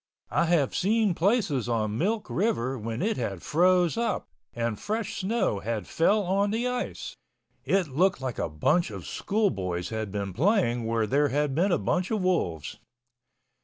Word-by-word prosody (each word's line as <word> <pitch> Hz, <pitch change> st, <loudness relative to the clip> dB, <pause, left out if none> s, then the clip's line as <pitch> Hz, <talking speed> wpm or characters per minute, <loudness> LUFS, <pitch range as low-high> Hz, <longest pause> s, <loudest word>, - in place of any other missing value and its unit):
I 170 Hz, -, +2 dB
have 165 Hz, -5 st, +2 dB
seen 215 Hz, 0 st, +2 dB
places 170 Hz, -, +1 dB
on 110 Hz, -2 st, 0 dB
Milk 210 Hz, +4 st, 0 dB
River 135 Hz, -, 0 dB
when 115 Hz, +2 st, -4 dB
it 220 Hz, +2 st, 0 dB
had 100 Hz, -7 st, -3 dB
froze 180 Hz, +3 st, +3 dB
up 235 Hz, 0 st, -1 dB, 0.3 s
and 115 Hz, -2 st, -2 dB
fresh 220 Hz, 0 st, -3 dB
snow 200 Hz, -, 0 dB
had 110 Hz, +1 st, -3 dB
fell 205 Hz, +6 st, +2 dB
on 200 Hz, +2 st, +1 dB
the 230 Hz, +4 st, 0 dB
ice, 250 Hz, 0 st, -4 dB, 0.5 s
it 195 Hz, -3 st, +2 dB
looked 180 Hz, +8 st, +2 dB
like 130 Hz, -3 st, -4 dB
a -, -, -1 dB
bunch 150 Hz, -, +1 dB
of 100 Hz, -5 st, -8 dB
school 210 Hz, -1 st, 0 dB
boys 90 Hz, -2 st, -3 dB
had 110 Hz, -3 st, -4 dB
been 100 Hz, -2 st, -3 dB
playing 125 Hz, -, +2 dB
where 115 Hz, -1 st, +1 dB
there 145 Hz, +7 st, +2 dB
had 145 Hz, +1 st, 0 dB
been 180 Hz, +7 st, +2 dB
a 175 Hz, -, +3 dB
bunch 180 Hz, +1 st, -1 dB
of 215 Hz, -4 st, -1 dB
wolves. 85 Hz, -, -1 dB
165 Hz, 170 wpm, -27 LUFS, -, 0.5 s, froze